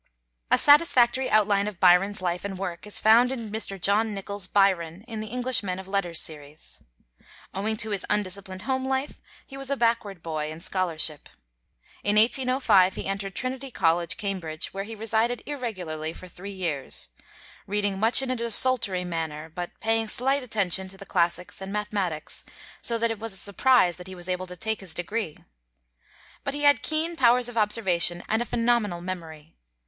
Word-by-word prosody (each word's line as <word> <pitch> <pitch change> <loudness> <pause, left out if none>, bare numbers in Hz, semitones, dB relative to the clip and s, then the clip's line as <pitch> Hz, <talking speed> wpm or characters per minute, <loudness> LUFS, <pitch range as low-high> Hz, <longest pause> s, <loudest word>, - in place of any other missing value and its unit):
A - - +5
satisfactory 265 -4 +5
outline 205 -1 +3
of 205 -4 -6
Byron's 185 +3 +4
life 175 0 -1
and 195 -1 -5
work 180 0 -5
is 210 - 0
found 235 +3 +5
in 230 -5 -5
Mr. 205 -3 0
John 205 +4 +1
Nichol's 200 -1 -4
'Byron' 185 -2 +1
in 225 -2 -6
the 215 - -5
'English 250 +2 0
Men 185 -3 -3
of 190 0 -8
Letters' 185 -4 -1
series. 150 -1 -2 0.7
Owing 215 +3 -1
to 220 -1 +2
his 200 -2 -1
undisciplined 190 -2 -2
home 260 +2 -1
life, 265 +2 -2 0.2
he 270 - -10
was 275 -1 -2
a 280 - 0
backward 230 -7 0
boy 155 -2 -3
in 155 +1 -8
scholarship. 165 -4 -1 0.7
In 205 +1 +1
1805 230 -4 +4
he - - -5
entered 195 0 -3
Trinity 265 +1 -3
College, 170 -5 +1
Cambridge, 180 -6 -4
where 195 +1 -4
he 225 +1 -7
resided 225 +2 0
irregularly 180 - -4
for 185 - -11
three 185 +2 -9
years, 170 - -2 0.6
reading 205 -1 -1
much 225 +5 +5
in 260 - -2
a - - 0
desultory 230 -5 +3
manner, 160 -2 -4
but 175 0 -6
paying 225 0 0
slight 270 +6 +1
attention 195 -6 -1
to 195 +1 -7
the 200 - -11
classics 180 0 -1
and 190 0 -6
mathematics; 200 -6 -2 0.4
so 235 - 0
that 230 0 +1
it 225 - -5
was 225 -2 -4
a - - -4
surprise 200 -3 +3
that 180 0 -10
he 190 - -8
was 175 0 -7
able 185 0 -2
to 180 - -8
take 220 +2 -2
his 180 -4 +1
degree. 175 -2 -3 1.1
But 280 - -3
he 290 - -3
had 285 -4 +5
keen 320 +2 -2
powers 245 -3 +4
of 245 - -8
observation 190 -6 +2
and 220 +2 +1
a - - -1
phenomenal 230 -7 0
memory. 165 -4 -7
200 Hz, 180 wpm, -26 LUFS, 180-230 Hz, 1.1 s, A